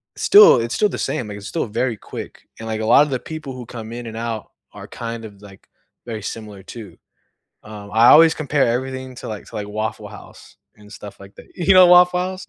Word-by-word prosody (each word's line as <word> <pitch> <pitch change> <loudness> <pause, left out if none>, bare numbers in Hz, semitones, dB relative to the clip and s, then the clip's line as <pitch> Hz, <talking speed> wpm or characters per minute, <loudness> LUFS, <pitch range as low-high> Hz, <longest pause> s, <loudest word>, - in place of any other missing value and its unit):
still 415 - +7
it's 115 0 -4
still 210 - +1
the - - -6
same, 115 - -3
like, 105 - -8
it's 100 - -10
still 165 - -3
very 115 +2 -2
quick, - - -10
and, 115 - -8
like, 110 -1 -3
a - - -3
lotta 145 +6 +4
the 130 -2 -2
people 155 -2 -8
who 125 -1 -9
come 115 -1 -9
in 120 0 -7
and 110 -1 -8
out 115 -2 -5 0.2
are - - -12
kind 115 -1 -7
of, 100 -2 -14
like, 100 -2 -16 0.4
very 110 -3 -6
similar, 105 -2 -8
too. 105 -7 -11 0.7
Um, 105 -1 -11
I 115 +2 +4
always 160 +3 +7
compare 145 -4 0
everything 130 +1 -4
to - - -9
like 105 -2 -7
to - - -13
like, 105 -1 -5
Waffle 110 0 -5
House - - -15 0.2
and 105 0 -18
stuff 105 -2 -11
like 100 +1 -14
that. - - -14
You 180 +2 +2
know 185 -1 +7
Waffle 180 0 +5
House? 185 +1 -5
115 Hz, 225 wpm, -20 LUFS, 105-140 Hz, 0.7 s, still